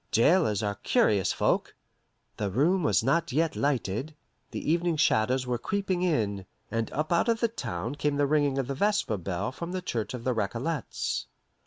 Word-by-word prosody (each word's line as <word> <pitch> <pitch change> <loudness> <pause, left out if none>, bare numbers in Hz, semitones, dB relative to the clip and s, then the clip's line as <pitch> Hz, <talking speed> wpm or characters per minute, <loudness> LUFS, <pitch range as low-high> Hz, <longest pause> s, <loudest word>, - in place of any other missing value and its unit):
"Jailers 115 - +3
are 100 -1 -2
curious 100 -4 +2
folk." - - 0 0.6
The 105 -2 -1
room 155 - +2
was 105 - +2
not 165 +6 +1
yet 160 +3 +1
lighted, 135 +1 -1 0.3
the - - -2
evening 170 -1 +1
shadows 130 -3 +2
were 125 -1 -1
creeping 195 - -1
in, 105 - 0 0.2
and 115 -1 -1
up 155 +3 -1
out 170 +7 +2
of 230 -1 +2
the 235 - +3
town 115 - -4
came 145 0 -1
the 145 - +3
ringing 145 -1 +2
of 135 - 0
the 140 - -3
vesper 200 - +1
bell 90 +3 -3
from 170 +6 -6
the 185 - -2
church 120 - -3
of 120 - -7
the 130 - +1
Recollets. 120 +8 -2
135 Hz, 180 wpm, -28 LUFS, 110-165 Hz, 0.6 s, Jailers